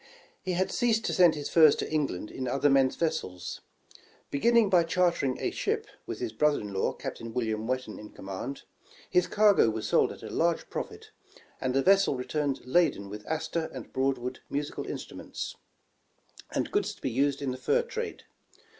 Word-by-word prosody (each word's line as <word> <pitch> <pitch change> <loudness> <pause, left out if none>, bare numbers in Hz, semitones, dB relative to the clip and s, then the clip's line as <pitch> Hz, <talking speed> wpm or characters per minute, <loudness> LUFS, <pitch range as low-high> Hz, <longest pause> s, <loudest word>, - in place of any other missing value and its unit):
He 185 -1 -2
had 185 +2 0
ceased 225 -2 +1
to - - 0
send 175 -4 +6
his 145 -1 -4
furs 155 -3 +6
to - - -3
Eng 155 -2 +1
land 90 +4 -6
in 130 - -4
other 140 +3 +2
men's 135 -1 +4
vessels. 155 - -3 0.7
Beginning 230 +9 +4
by 180 -3 +5
chartering 170 -6 +1
a - - -1
ship, - - -1 0.2
with - - -4
his 110 - -4
brother 150 +5 +3
in 105 -1 -6
law, 95 - 0
Captain 115 0 -6
William 110 -2 -1
Whet 130 +1 0
tan 110 - -9
in 105 - -9
command, 100 +8 -6 0.5
his 180 0 +3
cargo 205 - +5
was 110 -1 -3
sold - - +3
at - - -11
a - - -7
large 170 0 0
profit, - - -6 0.5
and 130 0 0
the 135 - +3
vessel 195 -6 +5
returned 140 +1 -2
laden 135 - +2
with 105 0 -8
Astor 160 +1 -2
and 130 -4 -9
Broad 135 0 +1
wood 125 +1 -5
musical 145 +1 -3
instruments, - - -6 0.9
and - - -2
goods - - 0
to - - -23
be 130 - 0
used 140 +3 +1
in 140 -2 -2
the 130 - -5
fur 475 - +2
trade. 465 -1 -5
140 Hz, 190 wpm, -29 LUFS, 125-170 Hz, 0.9 s, send